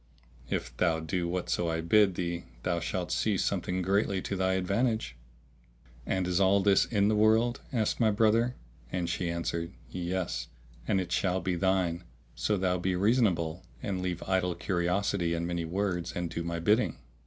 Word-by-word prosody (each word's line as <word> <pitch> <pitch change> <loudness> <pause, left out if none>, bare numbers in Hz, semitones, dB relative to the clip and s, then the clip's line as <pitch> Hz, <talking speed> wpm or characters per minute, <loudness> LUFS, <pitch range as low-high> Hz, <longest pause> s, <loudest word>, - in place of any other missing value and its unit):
If - - -3
thou 85 -3 +2
do 85 +2 -2
whatso 85 -1 -1
I 80 0 -1
bid 95 +3 +4
thee 85 -1 -3 0.2
thou 85 -1 0
shalt 85 +2 -3
see 105 -3 +1
something 90 0 -1
greatly 100 +1 +1
to 100 - -3
thy 95 0 +1
advantage." 100 - 0 0.9
"And 95 -1 0
is 90 +1 +1
all 100 +1 +4
this 100 0 +4
in 100 -3 +2
the 110 - +3
world?" 110 +3 +3
asked 115 -5 0
my 115 -3 +4
brother; 115 +3 +3 0.4
and 90 -2 -1
she 85 0 -1
answered, 85 +1 -3 0.2
"Yes, 90 0 -2 0.4
and 95 - +2
it 90 -2 -4
shall 95 -1 +1
be 95 -1 -1
thine, 90 -1 +1 0.3
so 105 - 0
thou 90 -1 +1
be 90 +1 0
reasonable 95 -5 +2 0.2
and 100 -6 -2
leave 90 -2 -3
idle 90 -2 0
curiosity 90 0 0
and 85 0 -2
many 85 -1 -2
words, 90 0 -2
and 90 -1 -3
do 85 - -3
my 85 0 -3
bidding." 105 +8 +2
90 Hz, 170 wpm, -29 LUFS, 85-100 Hz, 0.9 s, bid